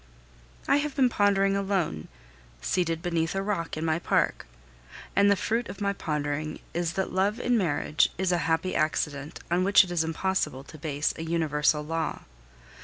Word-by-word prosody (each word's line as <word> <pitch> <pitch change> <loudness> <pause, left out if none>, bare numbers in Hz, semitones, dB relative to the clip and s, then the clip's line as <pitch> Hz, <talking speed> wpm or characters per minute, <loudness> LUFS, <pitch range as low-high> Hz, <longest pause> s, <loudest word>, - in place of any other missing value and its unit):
I - - +5
have 290 -1 -2
been 260 -3 +4
pondering 195 -2 +2
alone, 190 - -1 0.5
seated 165 - -1
beneath 170 0 0
a 195 - 0
rock 195 -6 -2
in 160 - -2
my 160 0 +1
park, 170 - 0 0.7
and 200 0 +5
the 200 - +5
fruit 230 +4 -1
of 200 - -8
my 200 -1 0
pondering 150 -3 -3 0.2
is 170 -1 -1
that 190 +2 -2
love 200 +5 +1
in 245 0 +1
marriage 160 -6 +2
is 185 0 +1
a 175 - +2
happy 165 +3 +1
accident 150 -1 -1
on 180 +1 +3
which 200 +1 +7
it 180 - -7
is 170 -2 +1
impossible 160 -4 -1
to 155 - -12
base 150 -1 -1
a - - -5
universal 155 -2 +1
law. 165 +1 -3
170 Hz, 175 wpm, -27 LUFS, 155-195 Hz, 0.7 s, which